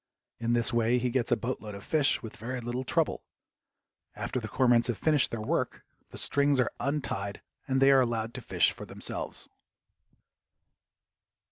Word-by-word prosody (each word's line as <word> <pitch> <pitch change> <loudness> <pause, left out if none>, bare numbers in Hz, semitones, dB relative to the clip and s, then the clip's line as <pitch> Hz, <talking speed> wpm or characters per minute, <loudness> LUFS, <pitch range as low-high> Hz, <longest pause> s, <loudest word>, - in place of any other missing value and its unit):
In 115 0 0
this 120 0 +2
way 120 +1 +3
he 125 0 0
gets 125 -1 0
a 120 - +4
boatload 110 -4 -4
of 100 - -9
fish 150 -4 +2
with 110 - -8
very 125 +3 -4
little 120 +2 -3
trouble. - - 0 0.9
After - - -2
the 110 - -5
cormorants 120 0 +3
have 120 -4 -1
finished 150 - +2
their 115 -2 -4
work, - - -1 0.2
the - - -10
strings 140 -1 +2
are 125 - +2
untied 115 -9 -2 0.2
and 135 -1 +1
they 135 +1 +6
are 135 -1 +6
allowed 115 -2 -1
to - - -6
fish - - +3
for - - -9
themselves. - - -4
120 Hz, 165 wpm, -29 LUFS, 115-130 Hz, 0.9 s, they